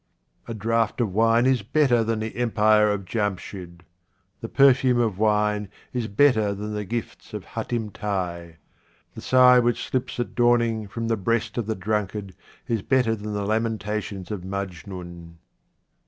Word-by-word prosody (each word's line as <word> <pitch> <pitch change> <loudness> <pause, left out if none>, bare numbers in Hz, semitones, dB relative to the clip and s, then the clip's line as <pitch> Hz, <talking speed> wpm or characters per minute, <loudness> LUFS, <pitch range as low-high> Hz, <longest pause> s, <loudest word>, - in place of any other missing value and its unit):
A 115 - -5
DRAUGHT 115 +2 0
of 110 -6 0
wine 115 +3 +3
is 130 -3 +3
better 120 +1 +2
than 110 0 -1
the 110 0 -5
empire 110 -3 +3
of 100 -2 -2
Jamshid. 95 -4 -4 0.6
The 115 - -7
perfume 135 -2 +4
of 110 -5 0
wine 105 -1 +1 0.2
is 120 -3 -2
better 110 -2 +3
than 105 +2 -5
the 105 0 -3
gifts 115 +3 -6
of - - -6
Hatim 110 -3 -4
Tai. 90 -5 -4 0.6
The - - -9
sigh 125 -1 +6
which 120 0 0
slips 130 -1 -3
at 120 - -3
dawning 120 -3 +2
from 115 +3 -4
the 115 -1 0
breast 115 +3 -1
of 110 - -3
the 110 - -1
drunkard 105 0 -3 0.3
is 115 -3 -1
better 125 0 +2
than 105 0 -6
the 100 -1 -2
lamentations 105 -3 -2
of 105 -4 -4
Majnun. 90 -2 -7
110 Hz, 155 wpm, -24 LUFS, 100-115 Hz, 0.6 s, sigh